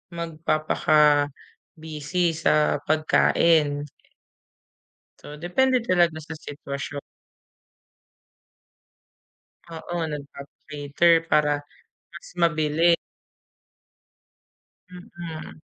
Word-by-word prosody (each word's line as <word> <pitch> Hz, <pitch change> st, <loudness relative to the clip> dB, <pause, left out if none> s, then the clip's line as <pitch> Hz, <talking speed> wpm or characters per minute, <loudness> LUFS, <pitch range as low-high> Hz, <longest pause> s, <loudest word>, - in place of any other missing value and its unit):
magpapaka-busy 155 Hz, 0 st, 0 dB
sa 155 Hz, -2 st, +1 dB
pagkain. 155 Hz, -1 st, +2 dB, 1.4 s
So, 150 Hz, -, -10 dB
depende 245 Hz, -, +1 dB
talaga 175 Hz, -6 st, +2 dB
sa 160 Hz, -, -11 dB
sitwasyon. 140 Hz, 0 st, -6 dB, 2.7 s
Oo, 170 Hz, +1 st, -7 dB, 0.2 s
nagpapa-cater 145 Hz, +2 st, -1 dB
para 150 Hz, -2 st, +3 dB, 0.6 s
mas 170 Hz, -, -11 dB
mabilis. 165 Hz, 0 st, +2 dB, 2.0 s
Mm. 170 Hz, -3 st, -9 dB
155 Hz, 55 wpm, -24 LUFS, 150-170 Hz, 2.7 s, para